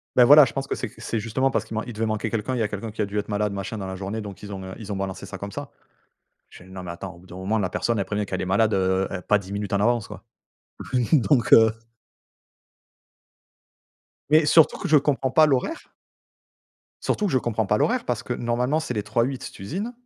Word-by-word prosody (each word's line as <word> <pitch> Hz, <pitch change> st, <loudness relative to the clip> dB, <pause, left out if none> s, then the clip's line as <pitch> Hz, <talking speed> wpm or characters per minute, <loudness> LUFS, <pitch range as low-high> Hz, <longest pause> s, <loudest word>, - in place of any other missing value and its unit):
Bah 125 Hz, -1 st, +7 dB
voilà 145 Hz, 0 st, +9 dB
je 120 Hz, -, -4 dB
pense 135 Hz, 0 st, -3 dB
que -, -, -2 dB
c'est 125 Hz, -, -5 dB
c'est 115 Hz, 0 st, -3 dB
justement 125 Hz, +5 st, 0 dB
parce 110 Hz, -, -1 dB
qu'il 110 Hz, -, -9 dB
man 110 Hz, -, -2 dB
il 120 Hz, -, -7 dB
devait 110 Hz, +1 st, -1 dB
manquer 110 Hz, +1 st, -1 dB
quelqu'un. 115 Hz, +4 st, -2 dB
Il -, -, -1 dB
y -, -, +1 dB
a 105 Hz, -, 0 dB
quelqu'un 105 Hz, +1 st, -5 dB
qui 110 Hz, -, -8 dB
a 105 Hz, -, +1 dB
dû 105 Hz, +1 st, -3 dB
être 105 Hz, -, -3 dB
malade 105 Hz, 0 st, 0 dB
machin 100 Hz, +3 st, -5 dB
dans 95 Hz, -, -5 dB
la 95 Hz, 0 st, -5 dB
journée, 100 Hz, +4 st, -4 dB
donc 100 Hz, -2 st, -9 dB
ils 100 Hz, -1 st, -8 dB
ont, 95 Hz, -1 st, -6 dB
heu, 95 Hz, 0 st, -7 dB
ils 105 Hz, -2 st, -6 dB
ont -, -, -3 dB
balancé 95 Hz, 0 st, -4 dB
ça 95 Hz, -1 st, -8 dB
comme 100 Hz, 0 st, -7 dB
ça. -, -, -6 dB, 0.8 s
Je -, -, -14 dB
fais: 90 Hz, -, -15 dB
«Non 95 Hz, 0 st, -9 dB
mais 90 Hz, -, -7 dB
attends 90 Hz, +2 st, -7 dB
au -, -, -16 dB
bout 90 Hz, -, -18 dB
d'un 90 Hz, -, -11 dB
moment 100 Hz, +4 st, -1 dB
la 95 Hz, -3 st, -1 dB
personne 115 Hz, -2 st, -1 dB
elle -, -, 0 dB
prévient 105 Hz, +1 st, -2 dB
qu'elle 95 Hz, -, -3 dB
est -, -, -3 dB
malade, 105 Hz, +3 st, +2 dB
heu, 95 Hz, 0 st, +1 dB
é 95 Hz, -, -4 dB
pas 105 Hz, -, +3 dB
10 100 Hz, 0 st, -9 dB
minutes 100 Hz, 0 st, -4 dB
en 100 Hz, -, +2 dB
avance» 120 Hz, 0 st, +1 dB
quoi -, -, -10 dB, 0.9 s
donc 140 Hz, -3 st, +3 dB
heu 110 Hz, -1 st, +8 dB, 2.6 s
Mais 155 Hz, 0 st, +5 dB
surtout, 160 Hz, +1 st, +5 dB
que -, -, -4 dB
je 155 Hz, -, +6 dB
comprends 135 Hz, -2 st, +1 dB
pas 155 Hz, -1 st, +6 dB
l'horaire 145 Hz, -, -1 dB, 1.1 s
surtout 210 Hz, -, 0 dB
que 180 Hz, -, -2 dB
je 130 Hz, -, +4 dB
comprends 110 Hz, -3 st, -1 dB
pas 105 Hz, -, +2 dB
l'horaire, 250 Hz, -, +1 dB
parce 120 Hz, -3 st, -2 dB
que 125 Hz, -, -4 dB
normalement, 120 Hz, +5 st, 0 dB
c'est 125 Hz, -, -4 dB
les 105 Hz, -, -1 dB
trois-huit 125 Hz, +4 st, -2 dB
d'usines. 190 Hz, -, -5 dB
110 Hz, 250 wpm, -24 LUFS, 100-125 Hz, 2.6 s, voilà